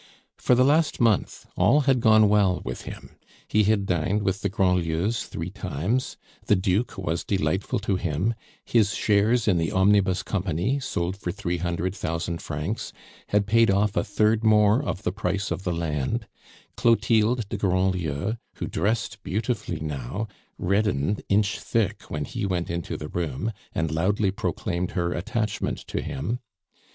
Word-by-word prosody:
For 125 - +3
the 130 +1 +4
last 155 +2 +3
month 115 -4 +1
all 150 - +4
had 135 -2 +3
gone 110 -2 +6
well 100 -3 +3
with - - -5
him; - - -10 0.3
he 105 -1 +3
had 105 -1 +2
dined 95 +4 0
with 95 +1 -1
the 100 - 0
Grandlieus 90 +1 +1
three 85 +3 -5
times; 95 - -2 0.3
the 105 - +5
Duke 95 +4 0
was 85 -2 -2
delightful 95 0 0
to 100 -2 0
him; 90 +5 0 0.3
his 105 -4 +2
shares 110 +3 +2
in 90 -5 +3
the 80 - 0
Omnibus 95 -1 +3
Company, 95 - -1
sold 90 -9 -2
for 90 -3 -3
three 90 -2 -2
hundred 85 +1 -2
thousand 85 -2 -3
francs, 75 +8 -4 0.4
had 105 0 +2
paid 115 +2 +4
off 100 +2 +2
a - - +2
third 105 +2 +2
more 105 +2 +5
of 105 -8 -4
the 90 - 0
price 100 -1 -2
of 95 - -3
the 90 - 0
land; 85 - -2 0.5
Clotilde 115 0 +3
de - - -4
Grandlieu, 95 0 0 0.2
who - - -4
dressed 105 -1 -1
beautifully 105 -5 -2
now, 75 - -4 0.3
reddened 100 -2 +1
inch 100 0 +2
thick 115 -5 -1
when 75 -1 -3
he 115 - -5
went 90 -4 -1
into 85 -1 -3
the 75 - -7
room, 85 - -2 0.2
and 80 -2 -1
loudly 95 +5 +1
proclaimed 90 -2 -2
her 85 -1 0
attachment 105 +3 -2
to - - -3
him. 115 +7 -3
100 Hz, 160 wpm, -25 LUFS, 85-110 Hz, 0.5 s, gone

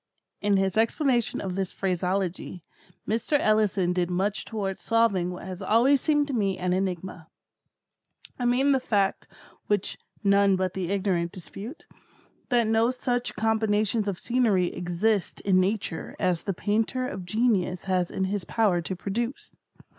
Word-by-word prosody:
In 205 -1 +3
his 195 +2 0
explanation 240 +1 +1
of 190 -2 -3
this 190 0 -2
phraseology, 185 -1 -2 0.4
Mr. 230 +7 +1
Ellison 210 -5 +2
did 180 -1 0
much 195 +3 -1
towards 200 -4 -4
solving 225 -6 +2
what 180 0 -7
has 185 -1 -7
always 255 +5 +4
seemed 295 -2 +2
to - - -2
me 200 -5 0
an 180 0 0
enigma. 185 -3 -3 1.1
I 245 - -1
mean 255 +4 +3
the 270 - +3
fact 200 -6 0 0.4
(which 205 -2 0 0.2
none 200 -1 +4
but 185 -1 -1
the 185 -3 -3
ignorant 185 -4 0
dispute) 205 - -9 0.6
that 240 -3 +3
no 225 +2 +3
such 245 -1 -2
combinations 220 -1 +1
of 195 -3 -2
scenery 220 -8 +1
exist 180 +3 -1
in 190 -2 +3
Nature 190 -3 -2
as 180 -2 0
the 195 - -1
painter 225 +6 0
of 190 -6 -6
genius 190 -2 0
has 185 -2 0
in 190 - -2
his 195 0 -1
power 200 -5 +1
to 185 +3 -4
produce. 230 +7 -4
200 Hz, 150 wpm, -26 LUFS, 185-225 Hz, 1.1 s, always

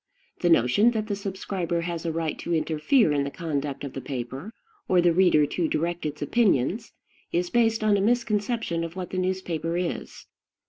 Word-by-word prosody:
The 175 - +2
notion 165 - +5
that 215 -2 -1
the 205 -2 -2
subscriber 190 -3 -3
has 170 0 -4
a - - 0
right 160 -1 -2
to 170 - -1
interfere 160 - +2
in 145 -1 +1
the 140 - -3
conduct 145 -4 -3
of 140 - -6
the 135 - -5
paper, 130 - -5 0.4
or 185 - +4
the 175 -1 +4
reader 170 -4 +4
to 165 +3 -1
direct 170 +1 -1
its 150 0 -5
opinions, 210 - +1 0.4
is 175 +1 -1
based 225 -2 +2
on 210 -1 +4
a - - 0
misconception 215 -5 0
of 165 +1 -6
what 185 -1 -5
the 185 - -1
newspaper 180 -3 -2
is. 180 -1 -4
175 Hz, 185 wpm, -26 LUFS, 155-200 Hz, 0.4 s, notion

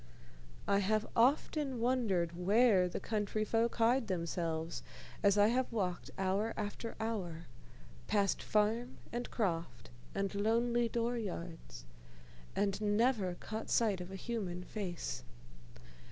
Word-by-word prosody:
I 200 0 +4
have 215 +2 +1
often 270 +2 +2
wondered 215 -9 +1
where 195 +1 +4
the - - -3
countryfolk 215 +2 0
hide 235 +1 +3
themselves, 170 -2 -2 0.4
as 200 0 +4
I 205 +1 +6
have 255 +2 +1
walked 185 -6 -2
hour 195 +4 0
after 215 +2 -4
hour, 180 -7 -3 0.6
past 200 -2 +2
farm 220 +4 +1 0.2
and 240 +1 -3
croft 170 - -2 0.2
and 195 0 -1
lonely 235 +3 +2
door 235 +1 0
yards, 170 - -6 0.7
and 200 0 0
never 210 -3 +2
caught 220 +4 -6
sight 210 -6 +2
of 175 - -7
a - - -5
human 190 -4 -3
face. 175 - -4
210 Hz, 120 wpm, -34 LUFS, 180-230 Hz, 0.7 s, I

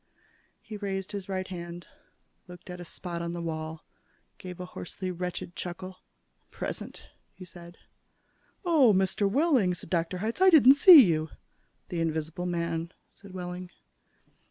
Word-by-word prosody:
He 215 -2 -9
raised 195 -2 -4
his 200 -2 -6
right 185 -1 -3
hand, 175 -1 -8 0.6
looked 180 0 -11
at 180 - -8
a 175 - -8
spot 170 0 -5
on 170 0 -4
the 175 - -5
wall, 160 -1 -5 0.5
gave 180 -1 -9
a 180 - -5
hoarsely 185 +1 -6
wretched 180 0 -5
chuckle. 185 +1 -7 0.5
"Present," - - -6 0.3
he 185 - -11
said. 175 0 -13 0.9
"Oh, 295 -10 +5
Mr. 190 +1 +1
Wehling," 255 - +2
said 165 - -13
Dr. 170 +1 -1
Hitz, 220 - -3
"I 380 - +8
didn't 280 -6 +8
see 295 0 +10
you." 160 -4 0 0.6
"The 170 -2 -2
invisible 160 +2 -2
man," 170 -1 -2 0.2
said 200 -2 -15
Wehling. 180 0 -6
180 Hz, 145 wpm, -28 LUFS, 170-195 Hz, 0.9 s, see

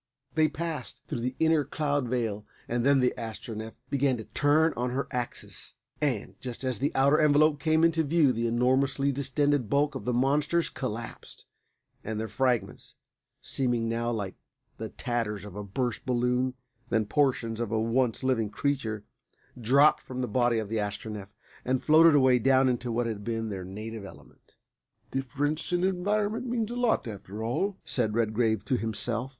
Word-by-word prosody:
They 155 -1 +4
passed 155 -3 -5
through - - -3
the 125 +2 -2
inner 160 -2 +4
cloud 145 -3 -1
veil, 115 -4 -1 0.2
and 120 0 -1
then 140 0 +4
the 125 - +2
Astronef 110 0 -6 0.2
began 135 -2 +2
to 110 - -6
turn 150 +6 +2
on 125 +1 -1
her 130 +3 -2
axis, 120 -1 -5 0.3
and, 130 -9 -1
just 125 0 -6
as 130 -4 -1
the 140 +3 +1
outer 140 +3 +4
envelope 150 0 +4
came 160 +1 +2
into 165 -1 +4
view 150 -3 +3
the 115 +1 -1
enormously 130 +4 +2
distended 140 -2 0
bulk 145 +3 +2
of - - -6
the 125 - +1
monsters 145 +7 +2
collapsed, 115 -3 -6 0.6
and 110 0 -3
their 110 - -2
fragments, 120 -2 -1 0.5
seeming 120 -3 0
now 115 +1 -1
like 100 -5 -3 0.4
the - - -5
tatters 105 -4 -3
of 100 -3 -10
a 105 - -5
burst 115 +3 -2
balloon 125 +1 0 0.3
than 110 -2 +2
portions 115 -2 +1
of 115 -3 -2
a 110 - +1
once 115 +2 +1
living 120 -5 +1
creature, 115 -4 -2 0.5
dropped 135 +5 +4
from 130 0 -6
the 125 - -1
body 120 +1 +2
of 110 -2 -2
the 110 +1 -1
Astronef, 105 0 -4 0.3
and 130 0 0
floated 160 0 +7
away 130 -3 +5
down 130 +2 +4
into 125 -1 -1
what 120 +1 0
had 110 -3 -4
been 115 -1 -2
their 95 -3 -5
native 110 +3 -7
element. 95 - -15 0.6
"Difference 145 +4 -1
of 175 0 +1
environment 205 +5 0
means 235 -2 -1
a - - -4
lot, 245 - +1
after 105 0 -7
all," 185 - -1
said 110 -4 +1
Redgrave 110 -2 +1
to 130 - +1
himself. 115 +3 -2
125 Hz, 170 wpm, -28 LUFS, 115-145 Hz, 0.6 s, floated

